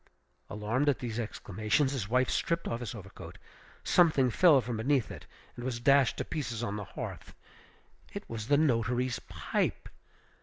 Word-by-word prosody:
Alarmed 115 +8 0
at 140 - +2
these 120 -2 -4
exclamations, 110 +4 -1
his 120 -8 -3
wife 125 +2 +3
stripped 170 0 -1
off 115 - -2
his 120 0 -5
overcoat. 95 -3 -10 0.5
Something 150 -8 +4
fell 160 +1 +6
from 120 -1 -3
beneath 130 +1 +1
it, - - -10 0.3
and 120 - -8
was 125 -2 -3
dashed 135 +1 +4
to - - -3
pieces 120 -7 -4
on 105 -3 -2
the 105 - -4
hearth. - - -8 0.8
It - - -7
was 110 -1 -6
the 145 - +4
notary's 125 -3 +1
pipe! 80 -6 -3
120 Hz, 160 wpm, -30 LUFS, 110-135 Hz, 0.8 s, fell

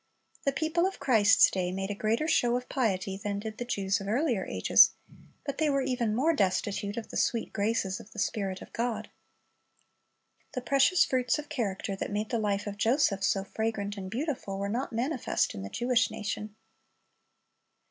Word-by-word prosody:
"^ - - -44
The 275 - +3
people 320 +5 +1
of 385 - -5
Christ's 220 -5 +5
day 180 -1 -1
made 195 +2 -3
a - - -1
greater 220 +8 0
show 245 -6 +3
of 250 - -7
piety 195 -7 -1
than 200 0 -3
did 215 +1 -6
the 245 - -3
Jews 200 -3 0
of 195 - -6
earlier 235 -2 +1
ages, - - +5 0.5
but 280 -1 -4
they 310 -1 +3
were 275 -1 +1
even 245 -4 0
more 305 +8 +3
destitute 200 - 0
of 230 - -5
the - - -4
sweet 230 - 0
graces 205 -2 0
of 225 -2 -13
the - - -15
Spirit 195 -3 -2
of - - -16
God. 235 -1 -2 1.4
The 255 - -2
precious 275 +8 +4
fruits 255 +1 +1
of 300 -1 -7
character 195 -4 -2
that - - -4
made 210 +1 -2
the 235 - +1
life 205 -1 0
of 205 -1 -5
Joseph 225 -3 +2
so 195 0 +2
fragrant 205 0 -3
and 190 -2 -6
beautiful, 240 - -3
were 200 +1 -2
not 245 +6 -2
manifest 245 +3 0
in 95 - -6
the 100 - -6
Jewish 240 - +1
nation. 210 0 -5
220 Hz, 190 wpm, -29 LUFS, 200-255 Hz, 1.4 s, Christ's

